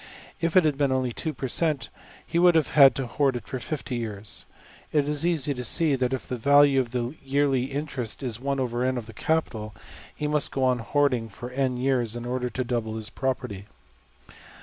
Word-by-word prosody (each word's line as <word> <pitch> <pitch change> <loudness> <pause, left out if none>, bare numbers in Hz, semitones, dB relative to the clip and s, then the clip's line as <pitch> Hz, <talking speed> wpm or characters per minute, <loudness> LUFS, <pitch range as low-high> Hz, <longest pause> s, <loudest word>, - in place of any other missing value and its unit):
If 165 +1 -1
it 180 - +6
had 145 -2 +1
been 140 -2 +2
only 130 -2 0
$2$~per~cent., 150 +1 -1 0.4
he 170 - 0
would 175 -1 +6
have 160 -3 +3
had 135 -4 +7
to 135 - -2
hoard 130 +1 0
for 130 - -5
$50$~years. 115 -6 -5 0.4
It 145 -2 +2
is 150 +1 +2
easy 160 -4 +1
to 125 -2 -5
see 155 +5 +3
that 125 -1 0
if 130 - -3
the 125 - -3
value 140 +2 +5
of 125 -3 -1
the 120 +1 -2
yearly 135 -2 +1
interest 135 -4 -4
is 120 -4 -3
$\dfrac{n}$~of 130 -2 -1
the 115 - -11
capital, 110 -7 -2 0.4
he 150 - -4
must 150 0 +1
go 135 - -1
on 125 -1 +2
hoarding 125 -2 +1
for 120 +4 -8
$n$~years 125 -3 0
in 120 0 -5
order 125 0 -2
to 130 +2 -3
double 115 -3 -2
his 110 +1 -5
property. 125 -8 -3
130 Hz, 180 wpm, -26 LUFS, 120-145 Hz, 0.4 s, had